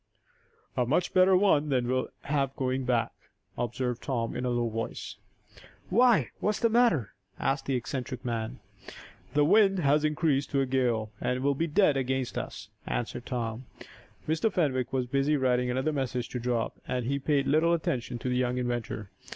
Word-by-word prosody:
"A 125 - +2
much 150 +9 0
better 185 0 +6
one 155 -7 +3
than 125 -3 +1
we'll 130 +1 0
have 140 -2 -1
going 130 0 -1
back," 120 -2 +1 0.4
observed 120 0 -2
Tom, 120 -4 -2
in 125 - -2
a - - 0
low 120 -1 0
voice. 115 0 -5 0.7
"Why; 240 +2 +4
what's 210 +1 0
the 230 - +3
matter?" 220 - +3 0.3
asked 135 +1 -1
the 135 - +1
eccentric 125 0 -4
man. 115 +1 -3 0.8
"The 145 0 +5
wind 195 +2 +5
has 150 -2 +3
increased 150 -2 +1
to 140 - +1
a - - +2
gale, 120 -5 0
and 125 0 -1
will 140 0 +3
be 165 +5 -1
dead 155 -3 +3
against 130 -1 -1
us," - - -5 0.2
answered 120 0 -3
Tom. 120 -1 -3 0.6
Mr. 160 +8 +1
Fenwick 130 -8 0
was 130 -2 0
busy 140 +4 +1
writing 125 -2 +1
another 130 +5 0
message 125 -3 -2
to 125 - -4
drop, 120 -1 -2
and 125 -2 -2
he 140 +3 0
paid 140 0 +1
little 155 +4 +3
attention 125 -6 -2
to 120 - -5
the 125 - 0
young 125 0 0
inventor. 120 -4 -3
130 Hz, 175 wpm, -28 LUFS, 125-150 Hz, 0.8 s, better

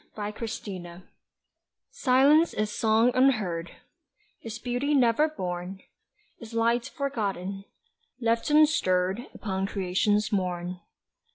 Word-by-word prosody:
SILENCE 205 -4 -6 0.9
Silence 285 +5 +4
is 210 0 -1
song 225 +2 +3
unheard, 210 -11 +1 0.7
Is 225 -1 -6
beauty 245 +5 -1
never 255 +3 +4
born, 185 - -5 0.6
Is 230 -1 -10
light 235 +2 +1
forgotten 200 - -3 0.5
left 230 +1 0
unstirred 235 - +2
Upon 195 -2 -3
Creation's 205 +3 0
morn. 180 -2 -2
215 Hz, 90 wpm, -27 LUFS, 190-245 Hz, 0.9 s, Silence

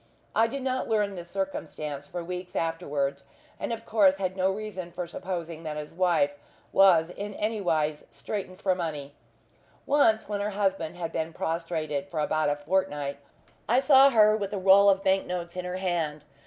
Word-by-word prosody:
I 225 - +4
did 270 +3 -5
not 260 -1 -1
learn 210 -2 +1
this 175 -2 -8
circumstance 155 -7 -4
for 175 +2 -5
weeks 180 +1 -6
afterwards, 145 -4 -1 0.4
and - - -3
of 230 0 -5
course 200 -4 +4
had 185 -1 -3
no 190 0 +2
reason 190 -3 -5
for 175 +1 -4
supposing 170 -2 -5
that 155 -2 -5
his 150 +1 -7
wife 185 +2 +2 0.4
was 175 -4 +5
in 205 +2 -6
anywise 170 -9 0
straitened 185 -3 -6
for 190 - +2
money. 150 -5 -4 0.7
Once, 245 -6 +3
when 205 -1 -2
her 205 - -1
husband 190 -5 0
had 170 -2 -4
been 160 +1 -3
prostrated 160 -4 -2
for 155 - -3
about 155 0 +1
a 145 - +1
fortnight, 145 -3 -1 0.5
I 245 +3 +5
saw 275 0 +7
her 215 -4 +5
with 205 -2 -3
a - - -1
roll 195 +1 +6
of 195 0 +2
bank 190 0 +2
notes 175 -1 -4
in 180 0 -4
her 180 0 -3
hand. 165 -5 -2
180 Hz, 180 wpm, -27 LUFS, 160-200 Hz, 0.7 s, saw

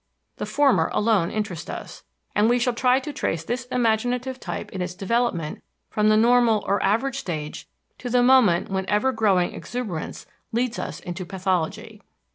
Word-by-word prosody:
The - - -4
former 285 -3 +3
alone 210 -6 +2
interest 205 -7 -4
us, - - -7 0.3
and 210 +2 +3
we 245 - +4
shall 245 0 +1
try 250 +2 +3
to 285 +2 -6
trace 165 - -2
this 240 +7 -3
imaginative 250 +1 0
type - - -6
in 190 - -5
its 180 0 -4
development 195 -5 -1 0.3
from 210 0 +2
the 215 - +5
normal 230 -1 +4
or 200 - +1
average 250 +7 +1
stage 155 - -5 0.3
to 245 - -5
the 245 0 +3
moment 230 -9 +5
when 190 0 -2
ever 210 +6 +2
growing 200 -7 +2
exuberance 215 -10 -5 0.3
leads 240 +1 -1
us - - -5
into 175 +1 -5
pathology. 180 -2 -2
220 Hz, 165 wpm, -24 LUFS, 190-245 Hz, 0.3 s, the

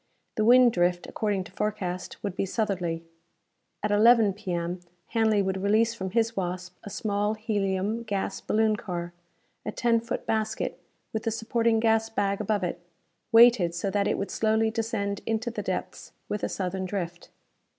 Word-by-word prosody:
The 215 - 0
wind 245 +2 +7
drift, 175 -2 +1
according 205 -3 -1
to - - -13
forecast, 185 -3 -3
would 200 -3 -3
be - - 0
southerly. 185 -5 -1 0.8
At 210 - 0
11 220 0 +6
P.M. 180 -3 -3 0.3
Hanley 220 -3 +2
would 190 0 -2
release 220 +3 +3
from 190 -5 -4
his 230 +3 +1
Wasp 180 -1 -4
a 205 - -7
small 205 0 -1
helium 205 0 -1
gas 205 -4 -3
baloon 215 0 +2
car 175 -3 -5 0.5
a - - -3
ten 235 -2 +2
foot 235 +2 -4
basket 220 -1 -1 0.3
with 220 - -1
the 225 - -1
supporting 225 0 +1
gas 225 0 +2
bag 200 -2 0
above 210 -1 0
it, 175 - -2 0.5
weighted 225 -7 +6
so 195 +3 -2
that 200 0 +1
it - - +1
would 200 - -3
slowly 220 0 +2
descend 220 -3 -2
into 225 +2 -1
the - - -4
depths, - - -5
with 210 - -3
a - - 0
southern 185 0 -3
drift. 175 -3 -5
210 Hz, 165 wpm, -27 LUFS, 190-225 Hz, 0.8 s, wind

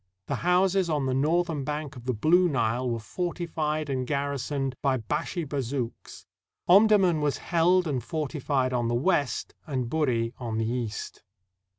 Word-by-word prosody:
The - - -2
houses 180 +1 +2
on 150 -3 0
the 130 - 0
northern 155 +2 +1
bank 150 0 -4
of 120 -1 -11
the 125 - 0
Blue 175 +10 +4
Nile 125 -2 0
were 115 - -1
fortified 155 +3 -3
and 130 -2 -2
garrisoned 140 -1 -2
by 135 -2 +2
Bashi 150 - -3
Bazouks. 135 -3 -4 0.4
Omdurman 195 -4 +5
was 145 -1 0
held 175 +1 +2
and 130 -6 -2
fortified 140 -2 -1
on 120 -1 0
the 120 - 0
west 145 0 0
and 130 -5 -2
Buri 125 -7 0
on 115 -3 -3
the 115 - 0
east. 115 -2 -4
140 Hz, 155 wpm, -27 LUFS, 125-165 Hz, 0.4 s, Omdurman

